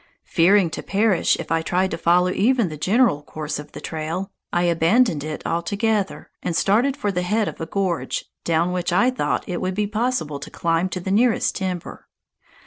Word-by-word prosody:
Fearing 180 0 +4
to - - -4
perish 200 -2 +2
if - - -6
I 165 0 +2
tried 185 +3 0
to - - -1
follow 180 +2 +3
even 230 0 +2
the 155 - -6
general 195 - +2
course 150 0 -5
of 150 - -10
the - - -7
trail, 165 +5 -4 0.2
I 175 - +1
abandoned 170 - +3
it 155 0 -6
altogether, 200 +4 -1
and 170 - -2
started 245 - +2
for 205 -7 -1
the 180 -2 -1
head 210 +4 0
of - - -6
a 160 - -3
gorge, 185 -2 -2 0.2
down 170 +1 +1
which 180 0 -1
I 240 +9 +3
thought 255 - -1
it 180 -3 -3
would 185 0 -2
be 210 +1 +1
possible 215 - -1
to - - -8
climb 165 +2 0
to 185 - -4
the 190 +2 -4
nearest 225 +2 +2
timber. 185 -3 -5
185 Hz, 195 wpm, -22 LUFS, 165-210 Hz, 0.2 s, Fearing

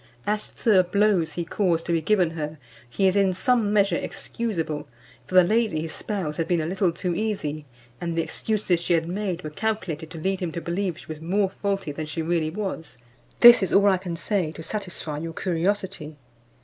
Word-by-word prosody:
As 210 +1 -1
to 225 - +1
the 190 -3 +6
blows 180 -4 +2
he 170 +1 -3
caused 170 -2 0
to - - -2
be 165 -1 +2
given 180 -1 +2
her, 155 -1 -5 0.3
he 195 +11 0
is 190 0 +4
in 195 -2 +3
some 225 +2 +2
measure 200 -4 +3
excusable; 175 -7 -3 0.4
for 185 - -5
the 185 - +9
lady 215 -4 +1
his 160 0 -5
spouse 185 -8 -3
had 165 - -1
been 175 -2 +2
a 155 - -1
little 185 +1 +1
too 175 +1 -2
easy, 165 -7 -2 0.4
and 170 -1 -3
the 165 - +2
excuses 190 +1 -1
she 170 +1 0
had 165 -1 +1
made 185 -1 -3
were 155 - -5
calculated 175 -5 -3
to 165 - -9
lead 190 +4 -1
him 175 -3 -3
to - - -3
believe 175 +1 -2
she - - -12
was 155 -1 -8
more 190 +3 +1
faulty 195 -5 -1
than 155 +2 -5
she 155 +2 -3
really 165 -1 0
was. 165 - -5 0.4
This 240 -2 +10
is 190 - 0
all 200 0 +5
I 190 - +3
can 180 -2 -5
say 180 -2 -1
to 160 - -9
satisfy 180 -7 -4
your 165 +1 -5
curiosity." 180 -3 -2
175 Hz, 210 wpm, -25 LUFS, 160-200 Hz, 0.4 s, This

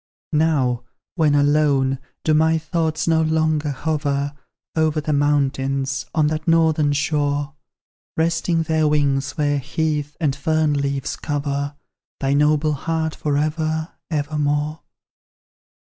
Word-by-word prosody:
Now, 145 -6 +2 0.3
when 155 -4 +2
alone, 145 -2 +2 0.2
do 155 - +2
my 160 +1 +4
thoughts 160 0 -1
no 160 -1 +3
longer 155 -1 +1
hover 145 0 -1 0.4
Over 155 -1 +2
the 150 0 -1
mountains, 135 -2 0
on 155 -2 +3
that 155 +1 -2
northern 160 -3 +3
shore, 145 0 0 0.6
Resting 165 +1 +1
their 160 -1 +1
wings 140 -1 +1
where 145 -1 +1
heath 150 +1 -2
and 145 -5 +1
fern 155 +1 +1
leaves 140 -1 -1
cover 145 -1 -3 0.4
Thy 135 0 +1
noble 150 +1 +3
heart 160 +2 -2
for 145 -2 -1
ever, 155 +1 -1 0.2
ever 150 -1 -2
more? 150 +2 0
150 Hz, 120 wpm, -21 LUFS, 145-160 Hz, 0.6 s, my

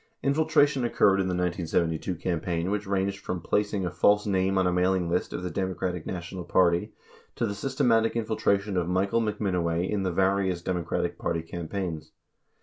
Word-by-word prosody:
Infiltration 145 -2 +3
occurred 100 -4 +3
in 95 - -1
the 90 - -1
1972 85 -1 -1
campaign 85 +1 -2
which 105 0 -2
ranged 95 0 -1
from 90 -2 -4
plac 105 +4 0
ing 100 -3 -1
a 85 - -2
false 105 +3 +3
name 95 -1 +1
on 95 - +3
a 90 - +2
mailing 90 0 +2
list 90 - 0
of - - -5
the 90 - -3
Democratic 90 -1 -3
National 90 0 -5
Party 85 -1 +2 0.4
to 120 - 0
the 100 - -2
systematic 115 0 +1
infiltration 105 -3 0
of 90 -1 0
Michael 100 +5 +1
McMinoway 90 -5 -1
in 105 -2 -1
the 95 -1 0
various 95 -1 +1
Democratic 90 -2 -2
primary 85 -1 -1
campaigns. 85 -2 -5
95 Hz, 170 wpm, -27 LUFS, 90-100 Hz, 0.4 s, Infiltration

